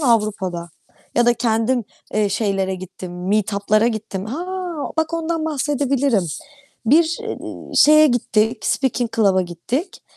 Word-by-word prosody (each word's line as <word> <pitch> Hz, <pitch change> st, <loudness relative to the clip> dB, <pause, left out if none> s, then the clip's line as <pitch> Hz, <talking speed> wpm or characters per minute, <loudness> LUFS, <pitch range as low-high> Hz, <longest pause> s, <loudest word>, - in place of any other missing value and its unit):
Avrupa'da. 205 Hz, -, 0 dB, 0.4 s
Ya 240 Hz, 0 st, +3 dB
da 240 Hz, -, +5 dB
kendim, 230 Hz, +1 st, +1 dB, 0.3 s
eee, 210 Hz, -1 st, +2 dB
şeylere 195 Hz, -2 st, 0 dB
gittim, 185 Hz, -1 st, -7 dB
meetup'lara 210 Hz, +1 st, +2 dB
gittim. 215 Hz, -4 st, -4 dB
Ha, 300 Hz, +11 st, -4 dB, 0.5 s
bak 320 Hz, +1 st, 0 dB
ondan 330 Hz, -1 st, -2 dB
bahsedebilirim. 275 Hz, -, +1 dB, 0.6 s
Bir, 320 Hz, +6 st, +4 dB
iii, -, -, -7 dB
şeye 305 Hz, +1 st, +7 dB
gittik, 225 Hz, -2 st, +1 dB
speaking 245 Hz, -3 st, 0 dB
club'a 195 Hz, -4 st, +4 dB
gittik. 235 Hz, -, -4 dB
225 Hz, 120 wpm, -20 LUFS, 195-275 Hz, 0.6 s, şeye